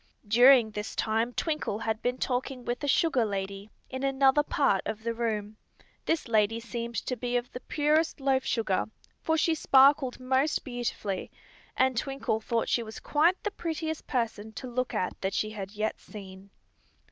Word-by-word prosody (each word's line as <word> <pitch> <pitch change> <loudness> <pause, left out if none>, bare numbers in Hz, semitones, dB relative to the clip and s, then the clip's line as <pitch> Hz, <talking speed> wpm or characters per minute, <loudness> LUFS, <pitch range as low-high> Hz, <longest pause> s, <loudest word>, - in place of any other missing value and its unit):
During 240 +1 +6
this 210 0 -5
time 225 +2 0
Twinkle 305 -6 -2
had 220 0 -2
been 250 +1 -1
talking 255 0 -2
with 240 +3 -3
a - - -1
sugar 280 -3 +3
lady, 200 0 -4 0.2
in 260 0 -6
another 270 +1 +4
part 275 -9 +1
of 220 0 -4
the 230 0 -1
room. 215 -2 -3 0.5
This 325 -4 0
lady 225 0 +2
seemed 235 0 -5
to 255 - -1
be 245 +1 -1
of 245 0 -4
the 250 - -6
purest 300 +4 +1
loaf 270 -1 +2
sugar, 220 -7 0 0.4
for 320 0 +1
she 325 +1 +3
sparkled 275 -3 +4
most 260 +4 +1
beautifully, 240 -6 -3 0.5
and 260 0 +3
Twinkle 245 -3 -1
thought 230 +1 -1
she 240 - +1
was 220 -1 -8
quite 330 +5 +2
the 420 - -1
prettiest 320 -3 -4
person 220 -4 -2
to 260 - -7
look 250 0 -2
at 180 - -2
that 190 0 -1
she 215 - -1
had 200 -2 -7
yet 215 +1 -2
seen. 195 -2 -11
245 Hz, 170 wpm, -28 LUFS, 220-270 Hz, 0.5 s, During